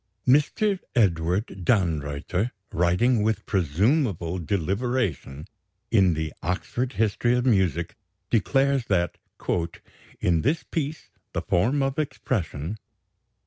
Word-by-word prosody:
Mr. 180 - +3 0.2
Edward 90 -2 +2 0.2
Dannreuther, 85 0 0 0.2
writing, 100 +8 +3
with 110 0 0
presumable 95 - +1
deliberation, 95 - -1 0.5
in 95 -6 +4
the 80 0 -3
"Oxford 120 +9 -2
History 110 +2 +1
of 125 - 0
Music," 90 - +1 0.4
declares 135 +4 +2
that 90 -4 0 1.0
"in 85 -3 +2
this 155 +6 +1
piece 155 -1 -4 0.2
the - - -2
form 125 +11 +2
of 135 +2 -1
expression 105 - -2
100 Hz, 100 wpm, -25 LUFS, 85-125 Hz, 1.0 s, in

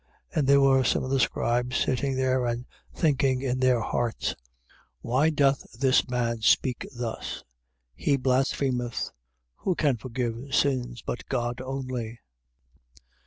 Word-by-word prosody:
2:6. - - -6
And 140 - +1
there 140 0 +6
were 135 -1 +5
some 115 - +1
of 130 - -4
the 135 - +2
scribes 125 +1 +1
sitting 135 +1 0
there 130 -1 +1
and 120 +1 -2 0.3
thinking 135 -4 +1
in 130 -1 -1
their 130 -2 +3
hearts: 120 0 -1
2:7. - - -4 0.7
Why 130 +7 +2
doth 140 -5 +1
this 130 -2 +3
man 115 -2 -1
speak 125 +3 +2
thus? 120 -2 -4 0.5
He 140 - +1
blasphemeth. 130 -2 0 0.5
Who 185 - -1
can 145 -7 +2
forgive 125 +3 -3
sins, 125 -4 0
but - - -4
God 120 -1 -1
only? 130 -3 -4
130 Hz, 140 wpm, -27 LUFS, 120-135 Hz, 0.7 s, there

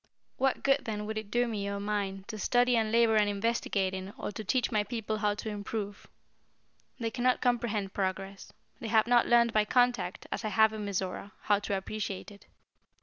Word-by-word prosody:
What 265 -1 +1
good 275 0 +2
then 210 -2 -3
would 215 0 -3
it 215 -2 -10
do 240 +2 +2
me 205 -3 -3
or 200 0 -3
mine 200 -2 -2
to 215 -1 -7
study 245 +4 +3
and 220 -2 +1
labor 230 -1 +4
and 210 -1 +3
investigate 200 -2 0
in 190 +1 -6
or - - -4
to 215 - -6
teach 250 +6 0
my 210 -2 +2
people 220 -1 -3
how 210 -1 +1
to 220 - -5
improve? 205 -1 -5 0.9
They 230 -1 -2
can 240 +1 -4
not 255 0 +3
comprehend 230 -5 0
progress. 195 0 -3 0.3
They 230 - -5
have 220 -1 +4
not 240 0 +4
learned 235 -1 +4
by 215 -1 +3
contact, 240 -6 +1
as - - -3
I - - -1
have 220 +2 +4
in 215 -1 -4
Mizora, 195 0 -3
how 205 -1 +2
to 205 -1 -2
appreciate 200 0 -5
it. 200 - -16
215 Hz, 205 wpm, -30 LUFS, 200-235 Hz, 0.9 s, labor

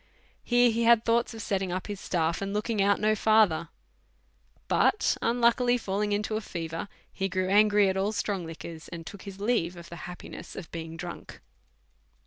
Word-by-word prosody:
Here 245 0 +4
he 230 +1 -1
had 230 -1 +5
thoughts 230 0 +1
of 220 - -6
setting 190 -2 -1
up 185 +1 -3
his 205 -2 -5
staff, 165 -2 -1
and 200 +1 -3
look 210 +3 -1
ing 215 -3 +1
out 200 +1 +3
no 215 0 +3
further; 215 -6 +3 1.0
but 425 - +3
unluckily 240 +1 +3
falling 205 -1 -2
into 210 +1 -1
a - - -3
fever, 165 -2 -5 0.3
he 195 0 -2
grew 185 0 -1
angry 205 0 +5
at 190 - 0
all 195 +2 0
strong 200 -3 -2
liquors, 165 0 -8
and 165 -1 -8
took 200 +2 -9
his 195 -1 -9
leave 200 -5 0
of 170 0 -11
the 170 - -8
happiness 180 - -9
of 175 -4 -8
being 165 0 -6
drunk. 175 +1 -8
200 Hz, 185 wpm, -28 LUFS, 175-220 Hz, 1.0 s, had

